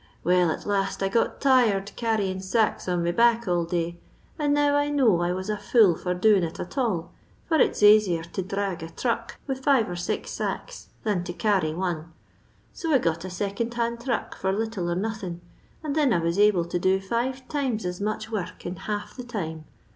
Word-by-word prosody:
Well, 180 0 +3
at 155 - -3
last 195 -1 -1
I 195 - +1
got 230 - 0
tired 225 -7 +3
carryin 210 -5 0
SMks 190 -1 0
on 175 -1 0
me 170 - +1
back 235 +3 +3
all 175 -1 +1
day, 170 0 -2 0.4
and 295 -1 +1
now 290 0 +3
I 290 0 +2
know 245 -12 +3
I 175 0 +1
was 185 +1 -3
a 210 0 -1
fool 210 -8 +4
for 180 +2 -2
doin 200 0 +4
it 165 -1 -4
at 175 - -6
all, 200 - -1 0.3
for 320 - +2
it's - - +2
asier 205 -5 +6
to - - -2
dbrag 195 -2 -3
a 165 - -5
thmck 230 +6 -2
with 270 -2 -3
five 265 -6 +4
or 175 - -4
six 175 - -3
sacks - - -5
than 205 -5 0
to 175 - -4
carry 185 -6 +1
one; 170 -3 -3 0.6
so 330 - -3
I 280 - +6
got 165 -6 -1
a - - -5
second 200 +6 -3
hand 235 0 -1
thruck 235 -1 -2
for 190 - -1
little 210 -3 -2
or 170 - 0
nothin, 190 -3 -4 0.4
and 300 -2 -2
thin 295 -4 +3
I - - +3
was 170 +3 -1
able 205 -5 +4
to 175 +1 -2
do 190 +2 +2
five 245 +6 -2
times 260 -9 -1
as 180 +1 -4
much 215 +1 -3
work 200 -5 -5
in 175 +1 -4
half 210 +2 -4
the 250 - -6
time. 160 -10 -5
200 Hz, 205 wpm, -26 LUFS, 175-235 Hz, 0.6 s, asier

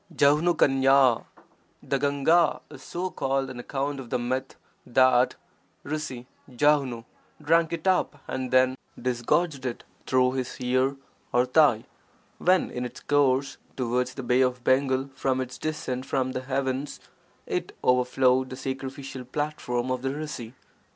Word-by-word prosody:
[^fich^l 140 -4 +4 0.3
— - - -38
The 140 0 -1
Gahga 145 +4 +2
is 140 -3 -11
so 180 +5 -4
called 135 0 -1
on 125 - -8
account 140 +2 -3
of 125 -3 -9
the 125 - 0
myth 130 +2 -3 0.3
that 130 0 +3 0.5
rsi 145 -5 -4 0.2
Jahnu 130 -3 +1 0.3
drank 165 +2 +2
it 170 +1 -4
up 180 -5 +1
and 130 -1 -3
then 130 0 +4 0.3
disgorged 130 +5 0
it 125 -2 -4 0.2
through 125 0 +3
his 130 0 -4
ear 130 +2 +1 0.4
or 125 +1 +3
thigh, 130 -4 +4 0.5
when 185 0 +3
in 125 - -4
its 125 - -7
course 140 -2 +1 0.2
towards 125 0 -1
the 135 - -5
Bay 125 +2 +3
of 125 -1 0
Bengal 130 +1 +1
after 130 -1 0
its 125 0 -10
descent 135 -4 -3
from 130 -1 0
the 130 0 -3
heavens 135 +1 -2 0.5
it - - -4
overflowed 125 +1 +3
the 130 - -6
sacrificial 135 0 -6
platform 130 -2 -3
of 130 -1 -1
the 135 - -1
rsi. 140 -5 -6
130 Hz, 145 wpm, -26 LUFS, 125-145 Hz, 0.5 s, ^fich^l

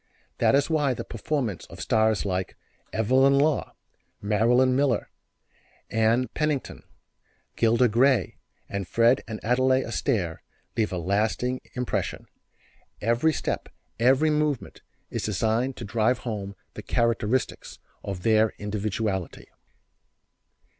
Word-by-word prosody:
That - - +4
is 140 - +3
why 150 -5 +1
the - - -5
performance 115 - -3
of - - -12
stars 110 -1 +2
like 95 -1 -2 0.3
Evelyn 130 +5 +3
Law, 150 +1 +1 0.4
Marilyn 120 +5 +3
Miller, 135 -5 +1 0.8
Ann 115 +3 +2
Pennington, 150 -1 -2 0.7
Gilda 115 +2 +3
Gray 125 +4 +2 0.3
and 100 -2 -4
Fred 115 +5 +3
and 110 -1 -5
Adele 130 +3 +3
Astaire 110 - -1 0.4
leaves 110 -2 0
a 90 - -2
lasting 110 +8 0
impression. 125 -1 -2 0.7
Every 120 +8 +2
step, - - -3 0.3
every 135 +6 +4
movement 150 -3 -1 0.3
is - - -2
designed 110 +5 0
to 120 - -6
drive 115 +3 +1
home 100 -5 -5 0.2
the - - -7
characteristics 115 +1 -1 0.3
of 95 -3 -5
their 110 -1 +4
individuality. 105 -2 -3
115 Hz, 115 wpm, -26 LUFS, 105-130 Hz, 0.8 s, That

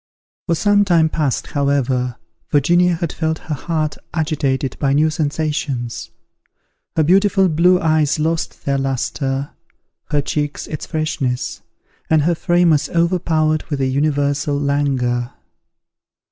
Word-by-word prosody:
For 170 - +2
some 205 +4 +3
time 170 -5 +3
past, 150 -5 -1
however, 135 -3 0 0.4
Virginia 175 +4 +3
had 170 -1 -3
felt 160 -1 -1
her 155 - -6
heart 155 +1 -2 0.2
agitated 145 -5 -1
by 140 -2 +1
new 155 +2 +3
sensations. 145 -5 -2 0.9
Her 160 - +3
beautiful 195 +3 +4
blue 180 +2 +4
eyes 155 -3 +2
lost 160 +1 -2
their 140 -1 +1
lustre, 135 +1 -2 0.5
her 145 -1 0
cheek 145 0 -2
its 155 - -6
freshness, 150 -6 -2 0.5
and 155 -2 +4
her 170 +3 +2
frame 175 +1 +2
was 150 0 +1
overpowered 165 -3 +1
with 145 -3 -2
a 135 - +1
universal 145 +1 0
langour. 135 -4 0
150 Hz, 125 wpm, -19 LUFS, 140-165 Hz, 0.9 s, beautiful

